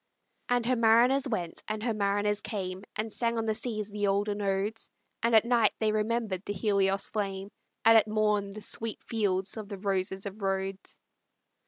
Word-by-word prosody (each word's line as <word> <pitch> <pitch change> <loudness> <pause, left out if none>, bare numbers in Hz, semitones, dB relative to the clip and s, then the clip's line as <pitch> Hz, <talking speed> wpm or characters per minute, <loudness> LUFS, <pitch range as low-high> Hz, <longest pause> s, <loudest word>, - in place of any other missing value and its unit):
And 245 -1 +2
her 255 +1 +2
mariners 240 +4 +4
went, 180 -9 -3
and 215 0 -3
her 235 -1 0
mariners 205 0 +1
came, 190 -3 -4
And 220 +1 -3
sang 235 +1 0
on 225 - -1
the 220 - +1
seas 215 -2 -3
the 205 0 -1
olden 205 +1 0
odes, 200 +3 -1 0.3
And 230 0 +3
at 220 - +6
night 240 -1 +3
they 220 -1 +1
remembered 215 -3 -1
the 205 - -3
Helios' 195 -1 +1
flame, 195 -2 -4 0.3
And 225 0 +8
at 220 - +6
morn 210 -1 +1
the 210 +2 -8
sweet 225 +1 -1
fields 195 -3 -1
of 210 -2 -7
the 200 - -5
roses 190 0 -1
of 200 +1 -7
Rhodes. 195 0 -3
210 Hz, 180 wpm, -29 LUFS, 195-225 Hz, 0.3 s, And